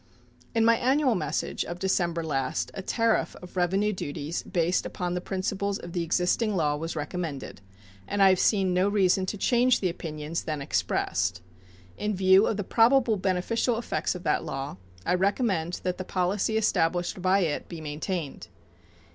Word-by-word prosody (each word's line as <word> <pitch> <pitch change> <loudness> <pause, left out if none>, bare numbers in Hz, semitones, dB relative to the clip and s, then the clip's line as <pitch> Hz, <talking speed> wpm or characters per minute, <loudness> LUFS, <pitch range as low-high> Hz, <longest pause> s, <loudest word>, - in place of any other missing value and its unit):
In 225 -1 +4
my 230 0 +5
annual 265 +1 +2
message 180 -7 -2
of 175 - -6
December 175 -3 0
last 135 -4 -2
a - - -5
tariff 225 +3 +1
of 180 0 -12
revenue 190 +4 +1
duties 145 -2 -4
based 175 -1 0
upon 175 -1 -3
the 180 - -2
principles 195 +2 -2
of 175 -3 -9
the 175 - -1
existing 180 +6 +1
law 150 -4 +1
was 165 +2 -4
recommended, 150 - -5 0.5
and 205 - -2
I 195 - +8
have 185 -1 +3
seen 190 -4 +2
no 185 +2 +2
reason 190 -2 +2
to 210 - -3
change 245 +3 +3
the 185 - 0
opinions 155 -1 -5
then 155 -2 -2
expressed. 140 -8 -1 0.6
In 210 0 -1
view 190 +2 +5
of 215 - -1
the 205 - -2
probable 235 +3 +4
beneficial 195 +6 0
effects 230 - -2
of 180 - -7
that - - +1
law, 135 -7 -5 0.3
I - - +2
recommend 185 -3 0
that 180 0 -2
the - - -2
policy 190 +4 0
established 175 -3 +1
by 190 +2 +3
it 160 -5 -2
be 170 - -7
maintained. 155 +1 -4
185 Hz, 170 wpm, -27 LUFS, 170-205 Hz, 0.6 s, I